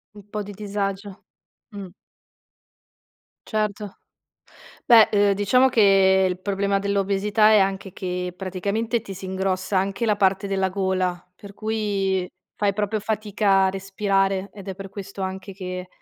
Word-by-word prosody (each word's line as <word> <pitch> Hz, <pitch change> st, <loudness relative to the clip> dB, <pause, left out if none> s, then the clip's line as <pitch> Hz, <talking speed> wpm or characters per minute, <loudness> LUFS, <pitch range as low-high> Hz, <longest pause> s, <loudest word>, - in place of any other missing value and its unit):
Un 205 Hz, -, -11 dB
po' 210 Hz, 0 st, -4 dB
di 205 Hz, -, -9 dB
disagio. 200 Hz, -1 st, -4 dB, 0.5 s
Mh. 200 Hz, -4 st, -9 dB, 1.6 s
Certo, 210 Hz, -2 st, -2 dB, 0.9 s
beh, 230 Hz, -2 st, +7 dB
uhm, 205 Hz, -1 st, +4 dB
diciamo 205 Hz, +7 st, +3 dB
che 195 Hz, -4 st, +5 dB
il 180 Hz, 0 st, -3 dB
problema 200 Hz, 0 st, 0 dB
dell'obesità 200 Hz, +2 st, +2 dB
è 215 Hz, -, +6 dB
anche 195 Hz, -1 st, -1 dB
che 180 Hz, -1 st, -4 dB
praticamente 200 Hz, +5 st, -2 dB
ti 200 Hz, -3 st, -9 dB
si 190 Hz, -, -10 dB
ingrossa 190 Hz, 0 st, -1 dB
anche 195 Hz, +4 st, -1 dB
la 215 Hz, -2 st, +3 dB
parte 195 Hz, 0 st, +1 dB
della 195 Hz, -1 st, 0 dB
gola, 185 Hz, -2 st, -1 dB
per 200 Hz, +2 st, -13 dB
cui 200 Hz, -4 st, -1 dB, 0.3 s
fai 200 Hz, -1 st, 0 dB
proprio 210 Hz, +1 st, -1 dB
fatica 205 Hz, -2 st, +1 dB
a -, -, +1 dB
respirare 195 Hz, 0 st, -1 dB
ed 200 Hz, -2 st, -11 dB
è 190 Hz, -, -4 dB
per 195 Hz, +1 st, -8 dB
questo 195 Hz, 0 st, -7 dB
anche 190 Hz, +1 st, -5 dB
che, 185 Hz, -1 st, -6 dB
195 Hz, 140 wpm, -23 LUFS, 190-205 Hz, 1.6 s, beh